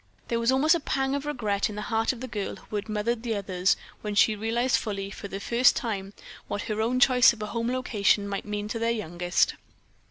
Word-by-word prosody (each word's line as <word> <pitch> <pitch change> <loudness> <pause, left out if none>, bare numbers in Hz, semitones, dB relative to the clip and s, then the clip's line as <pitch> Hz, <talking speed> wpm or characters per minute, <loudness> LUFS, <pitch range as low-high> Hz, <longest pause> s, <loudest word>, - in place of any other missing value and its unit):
There 235 - 0
was 230 +2 +2
almost 290 +5 +4
a 340 - +1
pang 270 -2 -1
of 285 +1 -3
regret 215 -9 -1
in 210 - -7
the 210 - -4
heart 225 0 +1
of 250 -2 -9
the 260 - -4
girl 210 -4 -4
who - - -10
had 205 - -5
mothered 220 +2 -1
the 230 -2 -2
others 190 -2 +1 0.3
when 210 -1 -4
she 215 +1 +4
realized 230 +4 +1
fully, 200 -2 -4
for 200 - -7
the 195 0 -6
first 235 +4 +4
time, 200 -5 -3 0.3
what 205 - -3
her 215 0 -2
own 245 +3 +1
choice 250 -1 +6
of 225 - -11
a 210 -1 -6
home 230 0 -1
location 210 -5 +1
might 200 -1 -4
mean 210 0 -3
to 230 - -3
their 230 0 +1
youngest. 180 -5 0
220 Hz, 230 wpm, -27 LUFS, 205-240 Hz, 0.3 s, choice